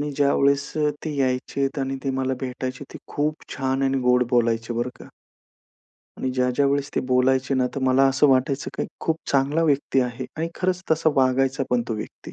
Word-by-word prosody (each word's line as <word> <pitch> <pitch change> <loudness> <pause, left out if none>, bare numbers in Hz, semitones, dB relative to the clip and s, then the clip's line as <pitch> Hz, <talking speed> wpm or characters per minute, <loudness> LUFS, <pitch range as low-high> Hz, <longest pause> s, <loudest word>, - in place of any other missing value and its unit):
मी 145 0 -2
ज्यावेळेस 140 0 +2
अ, 150 -1 +2 0.2
ते 155 -2 -3
यायचेत 135 +2 -1
आणि 135 0 -2
ते 135 - 0
मला 130 0 0
भेटायचे 130 +1 -4
ते - - -7 0.2
खूप 150 +1 -2
छान 135 0 -1
आणि 135 0 +1
गोड 125 0 +4
बोलायचे 115 -1 +1
बरं 120 +2 -1
का. - - -11 1.1
आणि 130 - -1
ज्या, 125 -1 +2
ज्या 140 - +3
वेळेस 140 0 0
ती - - +2
बोलायचे 130 +1 +2
ना, 130 -1 +2
तर 140 - -3
मला 130 +1 +4
असं 135 +2 +3
वाटायचं 135 +1 +1
की - - -1
खूप 160 - 0
चांगला 140 +4 +2
व्यक्ती 140 -3 +2
आहे 125 0 -3
आणि 165 +1 -2
खरंच 185 0 -1
तसा 160 0 +3
वागायचा 135 0 +2
पण 125 -1 +2
तो 115 - -1
व्यक्ती. 105 - -8
135 Hz, 195 wpm, -23 LUFS, 130-140 Hz, 1.1 s, गोड